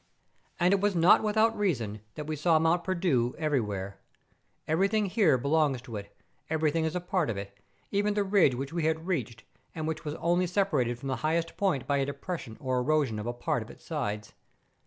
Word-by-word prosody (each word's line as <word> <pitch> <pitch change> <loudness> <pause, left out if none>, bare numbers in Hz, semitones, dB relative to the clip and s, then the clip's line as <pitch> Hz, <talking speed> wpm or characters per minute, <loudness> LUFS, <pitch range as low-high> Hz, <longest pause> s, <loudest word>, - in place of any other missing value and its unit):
And 180 +2 +4
it 195 - +2
was 205 -2 +1
not 170 +2 +6
without 220 +1 +2
reason 120 - -1
that 150 - -5
we 155 +1 -3
saw 160 +2 +3
^lont 165 +2 +2
Perdu 170 -11 +1
everywhere; 105 -11 -2 0.7
everything 195 +7 +2
here 185 - +3
belongs 140 0 +1
to 120 -3 -8
it, 100 -1 -8 0.3
everything 160 +1 +1
is 160 +2 -2
a - - +1
part 180 -3 -1
of 105 - -2
it, 100 0 -7 0.4
even 205 +1 +1
the 205 - +2
ridge 190 -9 +4
which 135 +5 -5
we 170 -2 -1
had 160 +1 0
reached, 130 - -3 0.3
and 155 -1 -3
which 160 0 -3
was 150 -1 -4
only 175 +2 +1
separated 155 - +1
from 135 +2 -6
the 130 - -1
highest 165 +2 -1
point 170 -11 0
by 140 - +1
a 135 - +1
depression 140 -5 -5
or 130 -3 0
erosion 140 -5 +1
of 105 - -5
a 120 - -1
part 120 0 -1
of 110 - -9
its - - -14
sides. 105 -10 -3
155 Hz, 200 wpm, -29 LUFS, 125-180 Hz, 0.7 s, not